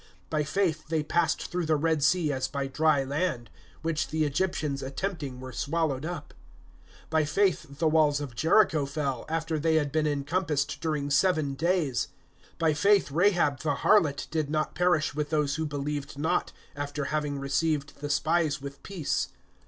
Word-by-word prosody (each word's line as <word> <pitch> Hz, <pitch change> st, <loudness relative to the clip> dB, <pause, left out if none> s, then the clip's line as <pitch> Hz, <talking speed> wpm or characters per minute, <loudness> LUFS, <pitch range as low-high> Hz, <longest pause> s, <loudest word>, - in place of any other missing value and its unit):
(29)By 150 Hz, -2 st, 0 dB
faith 160 Hz, -2 st, 0 dB
they 160 Hz, -1 st, 0 dB
passed 165 Hz, 0 st, +1 dB
through 175 Hz, -2 st, -1 dB
the 155 Hz, -, +3 dB
Red 160 Hz, 0 st, +1 dB
sea 155 Hz, -1 st, +3 dB
as 130 Hz, -1 st, -1 dB
by 140 Hz, -1 st, -3 dB
dry 145 Hz, +1 st, +2 dB
land; 135 Hz, -4 st, -2 dB, 0.3 s
which 160 Hz, -1 st, 0 dB
the 155 Hz, 0 st, 0 dB
Egyptians 150 Hz, -2 st, -1 dB
attempting 140 Hz, -2 st, -4 dB
were 130 Hz, 0 st, -7 dB
swallowed 150 Hz, +1 st, -1 dB
up. 170 Hz, -4 st, -6 dB, 0.8 s
(30)By 160 Hz, -2 st, +2 dB
faith 160 Hz, -6 st, +1 dB
the 160 Hz, -, +2 dB
walls 155 Hz, -2 st, +3 dB
of 145 Hz, -4 st, -6 dB
Jericho 160 Hz, -, +3 dB
fell, 140 Hz, -3 st, -2 dB
after 160 Hz, -1 st, -1 dB
they 160 Hz, +1 st, +2 dB
had 145 Hz, -3 st, +1 dB
been 155 Hz, +1 st, +1 dB
encompassed 150 Hz, 0 st, -1 dB
during 150 Hz, -3 st, -1 dB
seven 155 Hz, -3 st, +2 dB
days. 160 Hz, -4 st, 0 dB, 0.5 s
(31)By 160 Hz, -2 st, +2 dB
faith 200 Hz, -2 st, +4 dB
Rahab 170 Hz, -4 st, +3 dB
the 145 Hz, 0 st, 0 dB
harlot 155 Hz, -6 st, +3 dB
did 155 Hz, -2 st, -1 dB
not 155 Hz, 0 st, -1 dB
perish 175 Hz, -4 st, +2 dB
with 150 Hz, 0 st, -2 dB
those 150 Hz, -1 st, +1 dB
who 160 Hz, 0 st, -1 dB
believed 145 Hz, 0 st, -4 dB
not[11:31], 150 Hz, +3 st, 0 dB, 0.2 s
after 145 Hz, 0 st, -3 dB
having 150 Hz, -1 st, -1 dB
received 140 Hz, +1 st, -1 dB
the 145 Hz, -, -3 dB
spies 155 Hz, +1 st, +1 dB
with 140 Hz, 0 st, -8 dB
peace. 180 Hz, -7 st, -2 dB
150 Hz, 165 wpm, -28 LUFS, 140-165 Hz, 0.8 s, faith